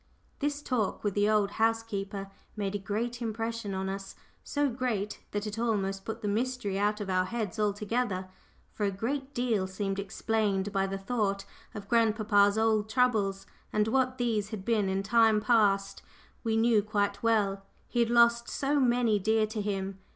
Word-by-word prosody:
This 290 0 -2
talk 235 -6 -1
with 205 -2 0
the 205 +1 +2
old 210 -2 +2
housekeeper 205 -3 -1 0.2
made 200 -2 -2
a 205 - -2
great 235 +5 -3
impression 225 -2 -3
on 190 0 -2
us 195 0 -5 0.3
so 290 0 0
great 230 -5 -2
that 205 0 -3
it 210 +1 -4
almost 195 -4 -1
put 220 - -5
the - - -1
mystery 215 -2 -1
out 210 +1 +1
of 205 - -4
our 185 -1 +1
heads 220 0 -4
altogether. 210 -1 -1 0.5
For 210 - -4
a 200 - +3
great 270 +8 -3
deal 230 -6 +1
seemed 195 +1 -3
explained 205 0 -1
by 195 -1 +1
the 195 0 -3
thought 195 -1 -1 0.3
of 200 -1 -7
grandpapa's 215 -3 +3
old 220 -1 +2
troubles, 215 -6 +1 0.3
and 215 +1 +1
what 255 +1 +1
these 220 -4 0
had 210 -4 -6
been 215 -4 +1
in 190 +1 -1
time 220 +1 +4
past 210 -3 +2 0.4
we 225 -1 +1
knew 225 -1 +4
quite 205 -1 -1
well. 205 -4 +1 0.2
He 240 - -2
had 235 -1 +3
lost 235 0 +4
so 285 +1 0
many 240 -4 +3
dear 220 +2 +2
to 215 0 -4
him. 195 -1 -3
215 Hz, 175 wpm, -29 LUFS, 200-230 Hz, 0.5 s, time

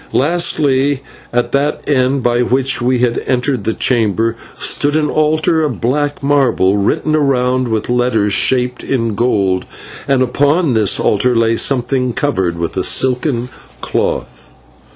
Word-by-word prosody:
Lastly, 145 -3 +1 0.3
at 120 0 -1
that 140 +2 0
end 130 -1 +1
by 120 0 +1
which 130 +2 +1
we 125 +1 +1
had 120 -1 0
entered 125 -3 -1
the 110 - 0
chamber, 115 -1 0 0.2
stood 145 +1 0
an 155 -1 0
altar 155 +1 +1
of 150 -6 -2
black 145 +4 -1
marble 130 -9 +2
written 105 +9 0
around 130 -3 +1
with 110 -2 -2
letters 120 -4 +1
shaped 125 +2 +1
in 115 -4 -1
gold, 100 -5 0 0.4
and 135 -2 +2
upon 145 +4 +1
this 110 -4 +1
altar 120 +4 +1
lay 115 0 +2
something 125 0 0
covered 95 -13 -1
with 85 -1 -4
a - - 0
silken 125 -1 +1 0.3
cloth. - - -3
125 Hz, 140 wpm, -15 LUFS, 115-140 Hz, 0.4 s, marble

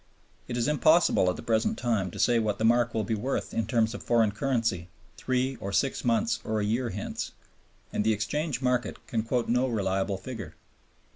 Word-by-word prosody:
It 120 - -3
is 120 - +1
impossible 155 - +4
at 90 - -1
the - - -8
present 115 -2 +1
time 110 -6 0
to - - -10
say 120 -1 +3
what 105 -2 0
the 110 - 0
mark 120 0 +3
will 110 - +1
be 110 - -2
worth 120 +6 -2
in 115 -3 -1
terms 115 -2 +1
of - - -7
foreign 115 -3 +3
currency 115 -7 -1 0.3
three 130 0 -1
or 100 -3 -5
six 135 +6 0
months 115 -1 +1
or 110 0 -1
a 105 - 0
year 115 +3 0
hence, 100 0 -5 0.6
and - - +1
the 110 - +3
exchange 130 +6 -2
market 125 -1 0
can 115 - -1
quote 115 +2 -1
no 125 +2 +2
reliable 95 -4 -1
figure. 110 -8 -8
115 Hz, 200 wpm, -28 LUFS, 105-125 Hz, 0.6 s, impossible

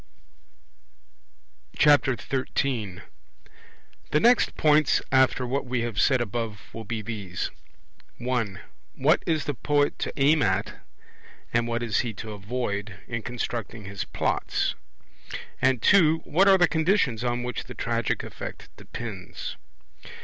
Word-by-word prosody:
13 130 - +1 1.1
The 150 - +3
next 240 +7 +4
points 155 -2 +4
after 130 -1 +3
what 135 +2 -2
we 125 -1 -1
have 115 -3 -1
said 130 -3 +4
above 115 -3 -4
will 115 - -6
be 110 0 -4
these: 100 -5 -4 0.7
(1) 120 -6 -2 0.3
What 145 +5 +3
is 160 -3 +1
the 145 - -1
poet 145 +2 +1
to - - -2
aim 145 +2 +4
at, 95 -2 0 0.7
and 120 0 +2
what 120 0 -1
is 110 -4 +1
he 120 -2 -1
to 110 +1 -7
avoid, 105 -2 -4
in 115 -1 -3
constructing 115 -2 -4
his 100 -1 -4
Plots? - - -1 0.9
and 130 -2 +2
(2) 160 -5 +5
What 190 +6 +3
are 195 -1 +7
the 175 -1 +5
conditions 160 - +1
on 120 0 -1
which 125 0 -4
the 125 - -10
tragic 115 0 -1
effect - - -8
depends? 100 -7 -7
120 Hz, 130 wpm, -26 LUFS, 110-145 Hz, 1.1 s, are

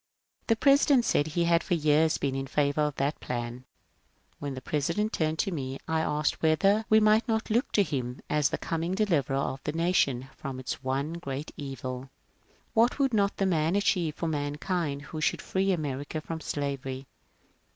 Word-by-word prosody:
The 225 - +4
President 275 0 +4
said 145 - +2
he 170 +2 0
had 170 0 +3
for 175 - +1
years 155 0 +3
been 140 -2 -1
in 135 0 -3
favour 145 +1 +1
of 150 -1 0
that 140 +3 -1
plan. 120 +1 -5 0.7
When 140 -2 -4
the - - -5
President 170 +11 -1
turned 155 0 0
to 195 - 0
me, 135 -5 -4
I 160 0 +1
asked 150 -1 0
whether 195 +7 +3
we 220 - +7
might 215 +2 +4
not 220 -1 -1
look 240 +6 +1
to 205 - +5
him 130 -6 -3
as 150 -3 +2
the - - -2
coming 165 +3 -2
Deliverer 165 - +1
of 135 -1 -2
the 150 - -2
Nation 160 -7 +1
from 135 -1 -6
its 130 0 -5
one 135 +4 -1
great 145 -3 -5
evil. 130 -2 -6 0.6
What 235 +1 +3
would 270 -3 +1
not 200 -2 +2
that 195 - +1
man 165 -1 +1
achieve 180 -6 +1
for 165 - -3
mankind 145 0 -2
who 155 +1 -6
should - - +1
free 195 +1 0
America 145 -3 -2
from 160 +1 -6
slavery? 135 -3 -3
155 Hz, 180 wpm, -28 LUFS, 140-185 Hz, 0.7 s, we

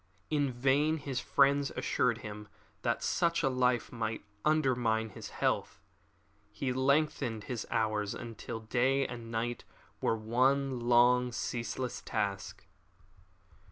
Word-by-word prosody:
In 145 -3 +2
vain 135 +5 +2
his 140 -4 -3
friends 140 +1 +3
assured 120 -2 +1
him 105 0 -7 0.3
that - - 0
such 170 -1 +1
a 135 - +3
life 125 -2 +1
must 110 -2 -3 0.2
undermine 125 -7 +2
his - - -8
health. - - -1 0.7
He 130 -2 -2
lengthened 130 -4 +1
his 120 -4 -4
hours 105 -2 0
until 115 -1 -6
day 130 +4 +2
and 120 -2 -7
night 115 +1 -2 0.4
were 115 - +1
one 130 +4 +1
long, 125 +1 +4
ceaseless 120 +1 -3
task. 100 -2 -3
125 Hz, 120 wpm, -32 LUFS, 115-135 Hz, 0.7 s, long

